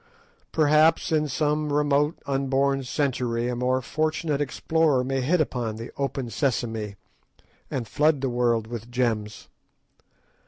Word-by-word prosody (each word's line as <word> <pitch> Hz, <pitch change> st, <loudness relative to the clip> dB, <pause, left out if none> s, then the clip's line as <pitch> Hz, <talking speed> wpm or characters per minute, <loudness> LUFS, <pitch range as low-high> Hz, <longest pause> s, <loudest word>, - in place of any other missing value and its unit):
Perhaps, 155 Hz, +1 st, +3 dB
in 155 Hz, -1 st, +2 dB
some 150 Hz, +1 st, 0 dB
remote 145 Hz, +1 st, +2 dB
unborn 135 Hz, 0 st, +1 dB
century, 125 Hz, -3 st, -1 dB
a 125 Hz, -, -2 dB
more 130 Hz, +1 st, 0 dB
fortunate 155 Hz, 0 st, -1 dB
explorer 145 Hz, -1 st, +1 dB
may 135 Hz, +1 st, -1 dB
hit 165 Hz, +8 st, +2 dB
upon 120 Hz, -7 st, -1 dB
the 115 Hz, +2 st, -8 dB
"Open 135 Hz, -2 st, -2 dB
Sesame," 110 Hz, -5 st, -1 dB, 0.7 s
and 120 Hz, -4 st, -3 dB
flood 150 Hz, +2 st, +2 dB
the 135 Hz, -, 0 dB
world 120 Hz, -2 st, +1 dB
with 115 Hz, 0 st, -7 dB
gems. 115 Hz, -4 st, -2 dB
135 Hz, 125 wpm, -25 LUFS, 120-150 Hz, 0.7 s, Perhaps